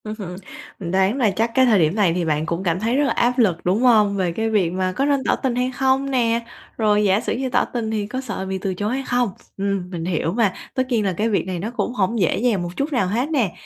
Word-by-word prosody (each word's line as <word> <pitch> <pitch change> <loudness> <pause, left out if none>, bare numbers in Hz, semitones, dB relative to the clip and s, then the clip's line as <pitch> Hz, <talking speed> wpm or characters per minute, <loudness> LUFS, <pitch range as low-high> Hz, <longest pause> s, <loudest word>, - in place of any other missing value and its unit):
Ưm 215 - -4
hừm, 180 -3 -6 0.4
mình 170 -3 -5
đoán 190 +6 +2
là 230 -7 +2
chắc 225 +4 0
cái 260 -1 +5
thời 220 -5 +4
điểm 160 +2 +2
này 195 -6 +3
thì 175 -1 -1
bạn 155 -1 0
cũng 170 +3 -3
cảm 170 -1 0
thấy 225 +4 0
rất 290 - +3
là - - +1
áp 245 +2 +1
lực, 185 -8 +2
đúng 190 +6 +2
hông? 215 -5 +4
Về 185 -3 0
cái 225 +6 -1
việc 195 -6 +1
mà 185 0 -1
có 270 +9 -1
nên 280 -2 +1
tỏ - - +2
tình 255 -3 -2
hay 250 +1 0
không 265 +1 +1
nè, 235 -3 +2 0.4
rồi 210 -2 +3
giả 195 0 +3
sử - - -2
như 260 0 -2
tỏ - - +2
tình 230 -3 -3
thì 210 -2 -2
có 255 +5 -4
sợ 230 -6 -5
bị 190 0 -3
từ 190 0 -3
chối 205 +5 -2
hay 270 +1 -2
không? 245 -2 +1 0.3
Ừm, 195 -2 -2
mình 170 -3 -5
hiểu 165 -2 -1
mà, 210 -4 +2 0.2
tất 260 - +1
nhiên 225 -5 +1
là 190 - 0
cái 215 +6 0
việc 200 -3 0
này 185 -2 -3
nó 215 +6 -4
cũng 220 +3 -1
hổng 220 +1 0
dễ 180 - +2
dàng 215 -5 +1
một 175 - -4
chút 285 +2 -2
nào 245 -8 +1
hết 240 +9 -1
nè. 245 - +1
210 Hz, 290 wpm, -21 LUFS, 185-245 Hz, 0.4 s, cái